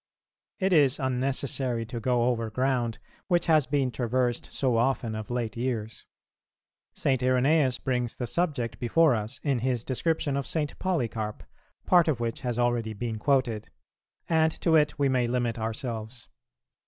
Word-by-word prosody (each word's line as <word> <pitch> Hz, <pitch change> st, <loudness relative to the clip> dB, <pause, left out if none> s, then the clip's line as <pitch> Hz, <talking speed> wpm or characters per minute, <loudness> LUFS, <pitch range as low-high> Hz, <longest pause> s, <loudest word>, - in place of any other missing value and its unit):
It 190 Hz, -1 st, +1 dB
is 145 Hz, -5 st, +4 dB
unnecessary 130 Hz, -2 st, -1 dB
to 120 Hz, +1 st, -5 dB
go 120 Hz, +1 st, +1 dB
over 115 Hz, -2 st, 0 dB
ground 125 Hz, -1 st, 0 dB, 0.3 s
which 175 Hz, -2 st, +2 dB
has 155 Hz, -4 st, +4 dB
been 135 Hz, -2 st, +1 dB
traversed 120 Hz, 0 st, -1 dB
so 130 Hz, -4 st, +1 dB
often 120 Hz, -2 st, +1 dB
of 110 Hz, -1 st, -6 dB
late 120 Hz, -3 st, -2 dB
years. 115 Hz, -3 st, -4 dB, 0.9 s
St. 130 Hz, -2 st, 0 dB
Irenæus 130 Hz, +1 st, +3 dB
brings 125 Hz, -2 st, -1 dB
the 125 Hz, -, -3 dB
subject 140 Hz, -4 st, -1 dB
before 155 Hz, +5 st, +4 dB
us 110 Hz, +2 st, -3 dB
in 140 Hz, -4 st, +1 dB
his 125 Hz, -1 st, -1 dB
description 145 Hz, +2 st, -1 dB
of 140 Hz, -, -3 dB
St. 150 Hz, -3 st, -2 dB
Polycarp, 115 Hz, -, -2 dB, 0.4 s
part 175 Hz, -2 st, +5 dB
of 145 Hz, -7 st, +1 dB
which 115 Hz, -1 st, -3 dB
has 120 Hz, -3 st, -2 dB
already 120 Hz, -2 st, 0 dB
been 110 Hz, +1 st, -4 dB
quoted; 125 Hz, -5 st, +1 dB, 0.6 s
and 160 Hz, -1 st, +3 dB
to 165 Hz, -2 st, +3 dB
it 150 Hz, -2 st, +3 dB
we 140 Hz, -2 st, +2 dB
may 125 Hz, -2 st, +1 dB
limit 120 Hz, -1 st, -1 dB
ourselves. 115 Hz, +1 st, -5 dB
125 Hz, 155 wpm, -27 LUFS, 115-140 Hz, 0.9 s, part